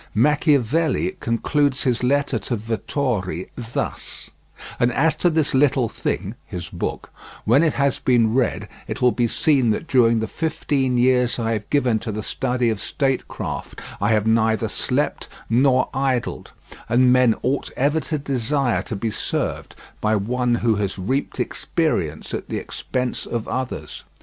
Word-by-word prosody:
Machiavelli 150 - +2
concludes 140 +4 +1
his 125 -4 +1
letter 140 -1 +1
to 120 - -3
Vettori 110 - -2
thus: 120 -1 -5 0.5
"And 120 0 +3
as 155 +6 +3
to 175 - +3
this 160 -3 +1
little 135 -3 +3
thing - - -3
[his - - -7
book], - - -4 0.3
when 120 +7 +5
it 160 -3 +3
has 140 -1 +1
been 115 -3 +3
read 125 -2 0 0.2
it - - -4
will 125 -1 +4
be 120 -1 +1
seen 135 -1 +2
that 110 - 0
during 115 -6 +4
the 110 - -1
fifteen 140 -3 -1
years 125 0 +3
I 115 -1 -1
have 105 -2 -3
given 125 -6 +2
to 110 - -4
the 105 0 -4
study 125 -1 0
of 110 - -4
statecraft 135 -2 -3 0.2
I 105 +3 +3
have 105 -1 +2
neither 110 -1 +2
slept - - -1 0.2
nor 130 +2 +4
idled; 130 -2 -1 0.4
and 125 +1 +5
men 125 -3 +4
ought 135 +3 0
ever 145 +4 +2
to 155 0 -2
desire 135 -2 0
to - - -5
be 110 +2 -2
served - - -3 0.3
by 110 0 +2
one 120 +4 0
who 110 -3 +3
has 100 -2 -2
reaped 130 +9 -2
experience - - -1
at - - -4
the - - -2
expense 125 -1 -3
of 115 -2 -3
others. 130 0 -4
125 Hz, 155 wpm, -22 LUFS, 115-140 Hz, 0.5 s, when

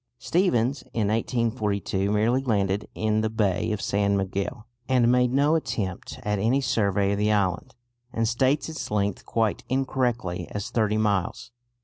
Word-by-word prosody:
Stephens 135 - +1
in 105 -3 +1
1842 110 -4 0
merely 115 +5 +2
landed 105 -4 0
in 110 0 +1
the 110 - 0
bay 110 -2 0
of 105 - -2
San 100 0 +1
Miguel, 100 +4 -3 0.2
and 125 -2 +4
made 125 0 +3
no 140 +4 +3
attempt 105 - -3
at 105 -1 -1
any 115 +7 +2
survey 100 -6 +1
of 100 - -1
the 105 +1 +2
island, 95 -3 0 0.4
and 115 -2 0
states 130 +5 +1
its 160 -1 -5
length 100 -2 -1
quite 110 -1 0
incorrectly 125 -9 -1
as 100 -1 -5
thirty 110 -2 +1
miles. 100 -3 -1
110 Hz, 150 wpm, -25 LUFS, 100-125 Hz, 0.4 s, and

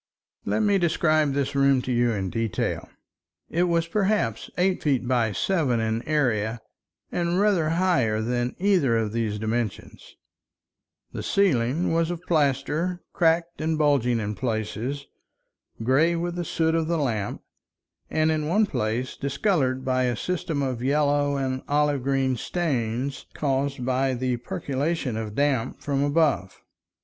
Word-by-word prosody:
Let - - 0
me 205 -2 +3
describe 155 -4 +2
this 140 0 -1
room 140 -1 +4
to 130 - -3
you 120 -1 +2
in 95 -4 -2
detail. 115 -4 -2 0.6
It 175 +2 +2
was 170 -1 +1
perhaps 195 - 0
eight 180 +1 +1
feet 135 -5 +1
by 120 -4 +2
seven 135 - +1
in 110 0 -1
area 120 -7 +1 0.5
and 175 +1 0
rather 195 -7 +3
higher 150 -13 +2
than 120 +2 -1
either 180 - +3
of 110 -2 -1
these 110 -2 -1
dimensions; 110 0 -4 1.0
the - - -5
ceiling 160 -5 +1
was 165 0 +1
of 175 -1 -3
plaster, 155 +3 0
cracked 170 0 +1
and 160 0 0
bulging 135 -6 +2
in 105 -1 -2
places, 115 +4 -3 0.8
gray 150 +8 +3
with 175 +1 -2
the 175 0 -3
soot 160 0 0
of 165 -1 +1
the 170 0 0
lamp, 115 -9 -2 0.7
and 155 0 +2
in 155 -1 -1
one 210 +7 +3
place 120 - -2
discolored 140 -3 0
by 130 0 +1
a 120 -1 0
system 160 0 -2
of 130 -3 -2
yellow 145 +1 +2
and 130 -1 -2
olive 145 -1 +1
green 135 0 +1
stains 135 -5 -2
caused 135 -2 -1
by 130 +1 +1
the 125 0 -1
percolation 140 +2 -2
of 110 -1 -4
damp 140 -4 0
from 140 -1 -1
above. 145 - +1
140 Hz, 145 wpm, -25 LUFS, 120-165 Hz, 1.0 s, room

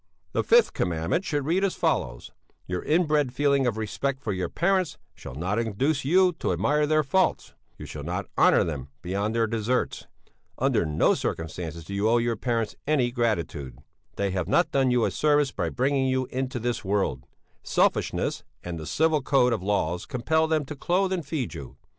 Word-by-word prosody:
"'The - - 0
fifth 475 0 +4
Commandment 85 - -1
should 145 -6 -2
read 175 +6 +1
as 195 - +1
follows: - - -1 0.3
"Your 90 0 -3
inbred 150 -4 +2
feeling 140 -2 +2
of 115 -3 -1
respect 130 +5 -2
for 110 -7 -3
your 90 -2 -2
parents 185 -3 0 0.2
shall - - -10
not 95 +8 -1
induce 130 +6 0
you 180 +5 +4
to - - 0
admire 145 - +1
their 155 0 +3
faults; 185 +7 0 0.2
you - - -8
shall - - -7
not - - -3
honour - - +5
them 70 -5 -4 0.2
beyond 100 +5 -2
their 115 -1 +3
deserts; 115 +3 -1 0.5
under - - +1
no 75 0 +3
circumstances 80 0 -4
do 100 - -7
you 100 +2 +1
owe 120 - +4
your 120 0 0
parents 115 -1 -2
any 135 -5 +2
gratitude; 85 - -2 0.4
they 100 -1 -1
have 90 -2 -2
not 175 - +2
done 135 -2 +2
you 125 -2 +3
a - - 0
service 145 -2 +2
by - - -2
bringing 135 +1 +1
you 130 0 +1
into 130 0 -2
this 120 0 -2
world; 95 -11 -1 0.4
selfishness - - 0 0.2
and 85 -2 -5
the 80 - -7
civil 160 -1 +2
code 125 -2 +3
of 110 - -2
laws 90 -3 -1
compel 160 +6 +1
them 155 -2 0
to 150 - -7
clothe 185 +6 0
and 170 -6 -3
feed 140 -5 -3
you. 65 - -9
125 Hz, 185 wpm, -26 LUFS, 100-150 Hz, 0.5 s, honour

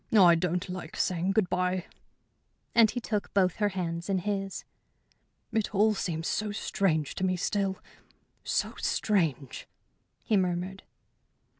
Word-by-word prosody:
I 185 -6 +7
don't 175 +1 0
like 180 -3 -7
saying 180 +2 0
good 205 -2 +3
bye." 180 0 0 0.9
And 230 -2 +6
he 245 - -2
took 215 -3 -3
both 185 -3 +3
her 210 -1 +2
hands 175 -2 -3
in 195 - +2
his. 195 0 -3 0.9
"It 220 -1 0
all 215 +2 +4
seems 165 -5 -2
so 210 -1 -1
strange 170 -7 0
to - - -4
me 185 -1 +2
still 195 +1 0 0.7
so - - -1
strange!" 160 - 0 0.6
he 215 - +2
murmured. 185 +1 -1
185 Hz, 135 wpm, -29 LUFS, 175-205 Hz, 0.9 s, I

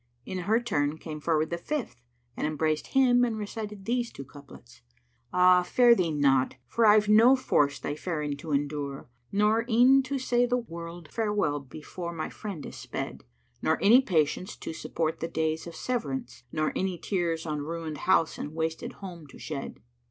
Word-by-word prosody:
In 185 - -4
her 210 +6 +2
turn 150 -11 -1
came 155 -1 -7
forward 155 0 0
the 170 - -2
fifth 235 - -4 0.3
and - - -1
embraced 155 0 -1
him 250 -2 +4
and 230 -3 0
recited 210 -1 -6
these 240 0 -1
two 140 - -9
couplets, 130 -4 -15 0.5
"Ah, 180 0 +6
fare 240 +7 +5
thee 180 -7 +1
not; 135 -3 +2
for 225 - +2
I've 210 0 +6
no 225 +5 +7
force 145 - +1
thy 145 - -4
faring 150 -2 -3
to 155 +2 -7
endure, 140 -2 -2
* 120 - -42
Nor 210 +3 +3
e'en 250 +4 +6
to 270 +1 -3
say 245 -1 +2
the 245 +1 +1
word 170 -6 -8
farewell 210 -10 0
before 155 +5 -7
my 160 -2 -4
friend 195 -9 -7
is - - -9
sped: - - -6 0.4
Nor 160 - +2
any 230 +6 +7
patience 180 - 0
to - - -7
support 160 0 -2
the 165 - -2
days 160 0 -2
of 170 - -9
severance, 135 - -4
* - - -40
Nor 155 -1 -1
any 185 -1 -1
tears 170 -3 -2
on 150 -2 -2
ruined 160 -1 -5
house 165 -3 +3
and 150 - -6
wasted 160 0 -3
home 170 -5 -8
to - - -14
shed." 140 -3 -6
170 Hz, 180 wpm, -28 LUFS, 150-215 Hz, 0.5 s, no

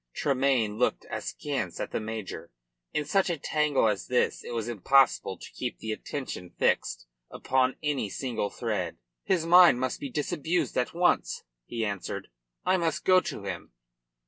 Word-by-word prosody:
Tremayne 130 -6 +1
looked 125 - +1
askance 125 - -3
at - - -3
the - - -1
major. 110 -2 -6 0.4
In 150 - -1
such 190 +5 +2
a 170 - 0
tangle 150 -4 +2
as 100 -4 -1
this 125 0 +1
it - - -8
was 115 -1 -2
impossible 120 -3 +3
to - - -11
keep - - -4
the 110 - -4
attention 110 -6 -5
fixed - - +1 0.2
upon 130 0 +1
any 145 -8 0
single 115 -3 -2
thread. 105 -8 -3 0.3
"His 175 -4 +1
mind 175 -6 +8
must 130 0 -1
be 140 - -5
disabused 160 +5 -1
at 125 +6 0
once," 175 +1 +2 0.2
he 115 -2 -2
answered. 100 -2 -4 0.4
"I 185 +1 +4
must 165 -2 -1
go 185 0 +7
to - - -6
him." - - -6
130 Hz, 160 wpm, -28 LUFS, 110-150 Hz, 0.4 s, mind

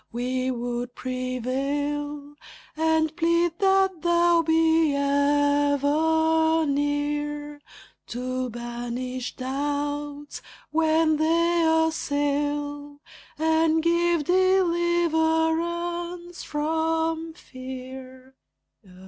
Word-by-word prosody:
We 255 +2 -2
would 245 0 -4
prevail, 280 +4 -3 0.4
And 320 0 +1
plead 335 0 +1
that 385 -3 +2
thou 345 -1 +3
be 320 -2 +3
ever 290 +3 +2
near 290 +1 -2 0.5
To 255 +1 -3
banish 240 +2 -5
doubts 290 +2 -4 0.3
when 315 0 +2
they 335 +2 +2 0.2
assail, 290 -1 -2 0.4
And 320 0 +2
give 340 -1 +2
deliverance 345 -1 +1
from 320 +1 -1
fear. 260 -1 -10
295 Hz, 65 wpm, -25 LUFS, 280-325 Hz, 0.5 s, thou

